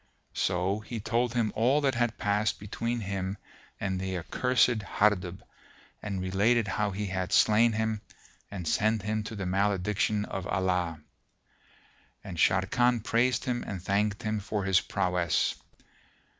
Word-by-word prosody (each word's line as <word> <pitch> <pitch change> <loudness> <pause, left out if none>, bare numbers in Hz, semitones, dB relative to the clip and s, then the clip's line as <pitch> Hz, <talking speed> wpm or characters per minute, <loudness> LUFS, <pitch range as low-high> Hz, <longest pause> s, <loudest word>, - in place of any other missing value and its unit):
So 95 +3 0
he 115 +1 -6
told 115 +3 0
him 115 -3 +1
all 125 +6 +3
that 135 -2 +2
had 120 -1 0
passed 105 +1 0
between 115 +3 -3
him 95 0 -3 0.4
and 95 -1 -2
the 95 -1 -3
accursed 120 +5 +2
Hardub 95 -2 0 0.6
and 100 -2 -3
related 100 +5 +2
how 105 +1 0
he 100 +2 -3
had 95 -2 -3
slain 115 +2 +5
him 110 -1 -1 0.5
and 90 -5 -6
sent 110 +2 +1
him 110 +1 -1
to 110 - -6
the 100 -2 -4
malediction 100 +2 +1
of 95 -1 -5
Allah; 90 -4 0 1.2
and 95 -4 -7
Sharrkan 105 +7 +2
praised 120 +3 +1
him 120 -2 -1
and 95 - -5
thanked 100 +3 0
him 110 0 -1
for 105 0 -3
his 95 -1 +3
prowess. 90 -4 0
105 Hz, 145 wpm, -29 LUFS, 95-110 Hz, 1.2 s, slain